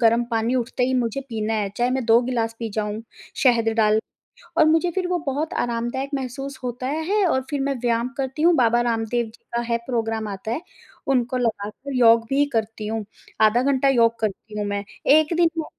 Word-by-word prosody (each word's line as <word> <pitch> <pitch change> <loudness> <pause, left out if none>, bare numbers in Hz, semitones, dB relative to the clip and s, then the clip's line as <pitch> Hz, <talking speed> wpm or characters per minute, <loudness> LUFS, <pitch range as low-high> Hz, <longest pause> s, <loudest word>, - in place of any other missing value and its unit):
गर्म 235 0 +4
पानी 230 +2 0
उठते 250 0 0
ही 260 - 0
मुझे 230 +4 -3
पीना 220 -1 -2
है, 205 -2 0
चाहे 245 +1 +1
मैं 260 -1 -1
2 230 +1 +5
गिलास 230 -2 -1
पी 230 -1 -3
जाऊँ 215 0 -2 0.4
शहद 235 -4 +3
डाल 215 -1 +4 0.6
और 320 - +6
मुझे 325 +3 +3
फिर 365 +1 -1
वो 360 0 0
बहुत 290 +3 -2
आरामदायक 240 +3 -2
महसूस 270 +1 -5
होता 245 +1 -3
है, 325 +8 0
और 265 -7 +2
फिर 290 -2 -2
मैं 275 0 0
व्यायाम 235 0 0
करती 270 +2 -3
हूँ, 345 +2 +5
बाबा 240 -2 +3
रामदेव 230 +1 0
जी 225 +1 -16
का 235 - +1
है 235 - +3
प्रोग्राम 225 -3 -2
आता 205 +2 -5
है, 275 - -2 0.5
उनको 255 -1 +1
लगाकर 230 +3 -3
योग 230 -1 +6
भी 280 +1 +3
करती 220 -1 -2
हूँ, 220 0 -2 0.4
आधा 220 +3 +5
घंटा 275 0 +2
योग 230 -3 +3
करती 210 0 -4
हूँ 205 - -1
मैं। 200 0 -2 0.3
एक 315 +1 +2
दिन 340 -1 +4
मैं 315 - -1
240 Hz, 200 wpm, -23 LUFS, 225-270 Hz, 0.6 s, और